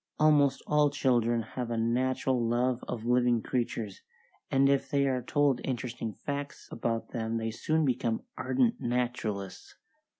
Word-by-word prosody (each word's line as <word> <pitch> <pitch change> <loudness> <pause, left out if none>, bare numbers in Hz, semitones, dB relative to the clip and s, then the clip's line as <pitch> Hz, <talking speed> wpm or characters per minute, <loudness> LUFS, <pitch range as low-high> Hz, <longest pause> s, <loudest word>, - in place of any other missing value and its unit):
Almost 145 -3 +4
all 150 -1 +3
children 120 -5 +1
have 120 +2 -5
a 115 - -1
natural 125 +2 +1
love 120 +2 +1
of 115 -2 -4
living 120 -1 +3
creatures, 115 -5 -3 0.5
and 135 0 +4
if 140 0 +2
they 140 -1 +2
are 130 -1 0
told 140 0 +1
interesting 120 -3 -3
facts 140 +4 -6
about 115 -1 -2
them 115 -1 -2
they 115 0 -2
soon 155 +7 0
become 120 -3 0
ardent 240 -2 +1
naturalists. 120 -5 -3
125 Hz, 140 wpm, -30 LUFS, 115-140 Hz, 0.5 s, Almost